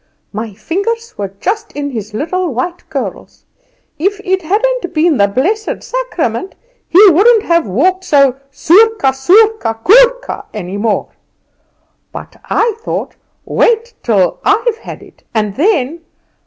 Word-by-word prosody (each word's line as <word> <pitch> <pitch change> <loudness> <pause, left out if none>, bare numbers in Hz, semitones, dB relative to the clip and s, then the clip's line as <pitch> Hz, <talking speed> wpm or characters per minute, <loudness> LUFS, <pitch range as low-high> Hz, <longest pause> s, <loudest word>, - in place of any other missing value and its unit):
My 215 -1 -5
fingers 400 - -3
were 200 -2 -5
just 430 +2 -3
in 285 0 -4
his 220 -3 -6
little 350 +6 -2
white 345 +8 -4
curls. 260 - -6 0.5
If 395 +5 0
it 375 -1 0
hadn't 410 +1 -1
been 310 -1 +2
the 200 -1 +4
blessed 365 - -2
Sacrament, 375 - -3 0.3
he 350 - +5
wouldn't 430 +6 +4
have 335 - +1
walked 365 - 0
so 275 -6 +3
sourka, 360 +1 +3
sourka, 360 - +2
sourka, - - +3
any 190 -1 -5
more. 210 0 -1 1.0
But - - -10
I 455 -2 0
thought. - - -4 0.3
Wait 465 +1 +1
till 195 -7 +1
I've 450 +2 +1
had - - -10
it, - - -19
and 210 -2 -1
then 325 - 0
345 Hz, 130 wpm, -14 LUFS, -, 1.0 s, he